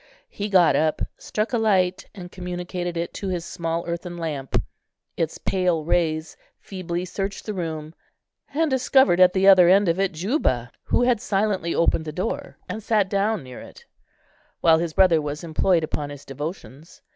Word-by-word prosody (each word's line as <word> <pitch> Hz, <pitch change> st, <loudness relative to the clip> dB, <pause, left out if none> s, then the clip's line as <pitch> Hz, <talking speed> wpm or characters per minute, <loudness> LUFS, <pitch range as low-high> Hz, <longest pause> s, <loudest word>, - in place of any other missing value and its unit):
He 205 Hz, +1 st, -4 dB
got 185 Hz, -4 st, +5 dB
up, 155 Hz, 0 st, +1 dB, 0.2 s
struck 215 Hz, +3 st, -3 dB
a 235 Hz, -, +2 dB
light, 185 Hz, -4 st, +1 dB
and 180 Hz, -3 st, -9 dB
communicated 180 Hz, -1 st, -5 dB
it 170 Hz, +1 st, -3 dB
to 200 Hz, -, -5 dB
his 175 Hz, -3 st, -3 dB
small 165 Hz, 0 st, -3 dB
earthen 175 Hz, +1 st, -5 dB
lamp. 150 Hz, -5 st, -2 dB, 0.6 s
Its 165 Hz, -1 st, -2 dB
pale 180 Hz, -4 st, 0 dB
rays 160 Hz, -2 st, 0 dB, 0.2 s
feebly 180 Hz, -2 st, -5 dB
searched 195 Hz, +2 st, -4 dB
the 215 Hz, -, -3 dB
room 160 Hz, -4 st, -5 dB, 0.6 s
and 320 Hz, +3 st, +1 dB
discovered 260 Hz, -7 st, +4 dB
at 185 Hz, 0 st, +6 dB
the 190 Hz, 0 st, +2 dB
other 185 Hz, -3 st, +8 dB
end 195 Hz, +1 st, +5 dB
of 170 Hz, +2 st, +1 dB
it 195 Hz, -1 st, +1 dB
Juba, 160 Hz, -, -1 dB
who -, -, +2 dB
had 245 Hz, -3 st, +2 dB
silently 195 Hz, -4 st, 0 dB
opened 165 Hz, -1 st, +2 dB
the 155 Hz, -, -4 dB
door, 185 Hz, +8 st, -4 dB
and 220 Hz, -, -5 dB
sat 210 Hz, -3 st, +1 dB
down 205 Hz, 0 st, 0 dB
near 125 Hz, -1 st, -10 dB
it, -, -, -14 dB, 0.7 s
while 160 Hz, -1 st, +5 dB
his 165 Hz, -1 st, -3 dB
brother 175 Hz, -4 st, +4 dB
was 150 Hz, +1 st, -5 dB
employed 170 Hz, +1 st, +1 dB
upon 150 Hz, -2 st, -3 dB
his 145 Hz, -1 st, -10 dB
devotions. 150 Hz, +1 st, -8 dB
175 Hz, 170 wpm, -23 LUFS, 160-195 Hz, 0.7 s, other